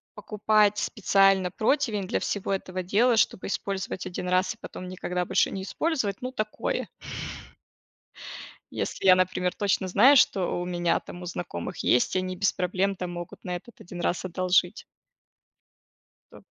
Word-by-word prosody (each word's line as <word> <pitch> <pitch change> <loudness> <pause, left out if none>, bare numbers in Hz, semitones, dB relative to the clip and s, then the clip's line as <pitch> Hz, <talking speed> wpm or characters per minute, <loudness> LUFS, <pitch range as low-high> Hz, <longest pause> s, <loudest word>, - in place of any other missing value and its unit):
покупать 210 0 +2
специально 195 -4 +3
противень 220 - 0
для - - 0
всего 200 -1 -2
этого 185 -1 -3
дела, 225 +6 +3
чтобы 185 - +1
использовать 195 -1 -3
1 180 0 -5
раз 185 +1 +1
и - - -31
потом 185 - -8
никогда 180 -1 -3
больше 190 +2 +2
не 190 - -4
использовать, 220 - -1
ну 255 - -4
такое. 215 -4 -3 1.8
Если - - -3
я, 185 - +9
например, 185 0 0
точно 200 -2 0
знаю, 235 +10 +6
что 185 -7 +3
у - - -2
меня, 175 -1 0
там, 175 - -11
у - - -7
знакомых 175 - -5
есть, 125 - +2
они 185 0 -2
без 200 +1 +2
проблем, 185 +2 -1
там, 180 -1 -5
могут 175 -1 -8
на 180 - -3
этот 230 +7 -13
1 175 0 -9
раз 175 +1 -1
одолжить. 185 +1 +1 1.5
Да. - - -14
185 Hz, 150 wpm, -26 LUFS, 180-205 Hz, 1.8 s, я